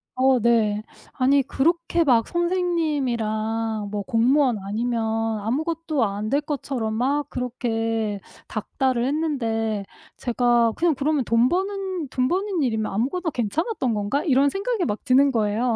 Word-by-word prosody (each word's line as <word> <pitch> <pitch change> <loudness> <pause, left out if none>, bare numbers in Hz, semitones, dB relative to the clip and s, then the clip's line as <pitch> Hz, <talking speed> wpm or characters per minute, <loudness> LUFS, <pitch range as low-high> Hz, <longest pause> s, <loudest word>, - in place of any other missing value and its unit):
어 260 0 +4
네. 220 -3 +2 0.3
아니 275 +2 +3
그렇게 335 +5 +1
막 240 -7 +3
선생님이랑 240 - -1
뭐 210 -1 -2
공무원 245 +3 +2
아니면 230 +3 -1 0.4
아무것도 310 +5 -1
안 205 +1 -3
될 280 +4 +2
것처럼 270 -6 -3
막 280 +5 0
그렇게 225 -4 -2 0.3
닦달을 255 -3 -1
했는데 230 -8 -1 0.3
제가 240 -1 +2
'그냥 340 -1 +2
그러면 285 0 0
돈 230 +2 +3
버는 380 -2 -2
돈 255 0 0
버는 375 0 0
일이면 220 -4 -1
아무거나 280 - -1
괜찮았던 255 - -1
건가?' 210 +7 -1
이런 280 -2 +4
생각이 400 - -2
막 210 -3 -3
드는 275 +1 +5
거예요. 225 +1 +1
255 Hz, 290 characters per minute, -23 LUFS, 225-305 Hz, 0.4 s, 드는